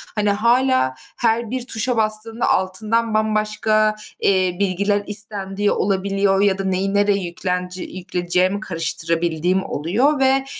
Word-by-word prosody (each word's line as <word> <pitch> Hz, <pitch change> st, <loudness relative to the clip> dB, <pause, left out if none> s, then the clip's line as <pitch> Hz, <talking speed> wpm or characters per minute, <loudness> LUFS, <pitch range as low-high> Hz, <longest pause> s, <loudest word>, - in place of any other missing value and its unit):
Hani, 210 Hz, -1 st, +1 dB
hâlâ 235 Hz, -, +2 dB, 0.2 s
her 230 Hz, -1 st, 0 dB
bir 255 Hz, -1 st, -3 dB
tuşa 230 Hz, +2 st, +1 dB
bastığımda 220 Hz, +1 st, 0 dB
altından 215 Hz, +5 st, 0 dB
bambaşka, 215 Hz, 0 st, +1 dB, 0.3 s
eee, 185 Hz, -2 st, +2 dB
bilgiler 200 Hz, +1 st, 0 dB
istendiği 205 Hz, -1 st, -2 dB
olabiliyor 195 Hz, 0 st, +1 dB
ya 200 Hz, -2 st, +3 dB
da 195 Hz, -, -3 dB
neyi, 190 Hz, +1 st, -1 dB
nereye 205 Hz, 0 st, +2 dB
yüklenci 180 Hz, +1 st, -3 dB
yükleyeceğimi 180 Hz, +1 st, -1 dB
karıştırabildiğim 170 Hz, -1 st, 0 dB
oluyor 235 Hz, -, 0 dB
ve, 265 Hz, 0 st, +3 dB
200 Hz, 120 wpm, -20 LUFS, 185-215 Hz, 0.3 s, ya